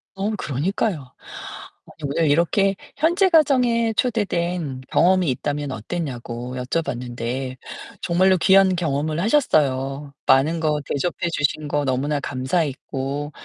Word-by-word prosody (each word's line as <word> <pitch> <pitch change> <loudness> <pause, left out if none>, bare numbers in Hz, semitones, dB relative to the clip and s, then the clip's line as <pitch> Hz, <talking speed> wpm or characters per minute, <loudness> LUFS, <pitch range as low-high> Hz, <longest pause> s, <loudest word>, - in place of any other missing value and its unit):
어, 195 +2 -1
그러니까요. 150 - -2 0.7
아니 150 -3 -7
오늘 155 +2 +1
이렇게 185 +6 +2 0.2
현재 345 +6 +3
가정에 250 -8 +3
초대된 175 - -1
경험이 185 -1 +3
있다면 145 +2 -3
어땠냐고 125 -2 -5
여쭤봤는데, 125 -2 -3 0.4
정말로 185 +2 +3
귀한 190 +2 +5
경험을 155 -2 -1
하셨어요. 140 - +1
많은 155 +5 +4
거 150 -2 0
대접해 170 +5 -2
주신 150 0 -1
거 145 0 0
너무나 140 +3 0
감사했고, 140 +1 -2
155 Hz, 285 characters per minute, -22 LUFS, 135-185 Hz, 0.7 s, 귀한